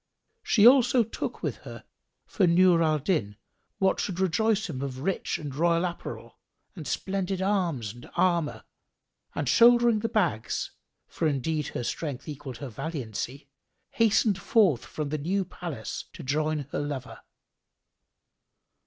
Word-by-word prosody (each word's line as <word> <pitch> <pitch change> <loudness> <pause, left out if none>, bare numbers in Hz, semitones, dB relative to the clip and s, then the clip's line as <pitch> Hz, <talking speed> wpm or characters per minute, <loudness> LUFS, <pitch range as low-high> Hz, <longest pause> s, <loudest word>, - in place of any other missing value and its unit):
She 210 -2 +4
also 250 -1 +6
took 225 - -5
with - - -2
her - - -10 0.4
for 190 -5 +1
Nur 175 0 +5
al 155 -1 +3
Din 135 - -1 0.4
what 190 -1 +2
should 185 -3 -3
rejoice 210 +3 +1
him 140 -6 -5
of 130 -2 -5
rich 190 +4 -1
and 145 -3 -6
royal 170 +4 +2
apparel 175 -1 -7 0.4
and 160 -6 -7
splendid 190 +2 -2
arms 175 - 0
and 120 0 -13
armour, 170 -5 +1 0.7
and - - -2
shouldering 235 -1 +6
the 225 +2 -2
bags 160 - -1 0.3
(for 165 - -2
indeed 150 +1 -1
her 120 - -3
strength 140 +1 -4
equalled 140 -4 -7
her 140 - -6
valiancy), 135 +1 -5 0.4
hastened 220 -3 +3
forth 180 - +3
from 150 -2 -4
the 155 +1 -2
new 190 +6 0
palace 155 - -6
to - - -9
join 150 +2 0
her - - -2
lover. 145 -3 -5
165 Hz, 140 wpm, -27 LUFS, 140-195 Hz, 0.7 s, also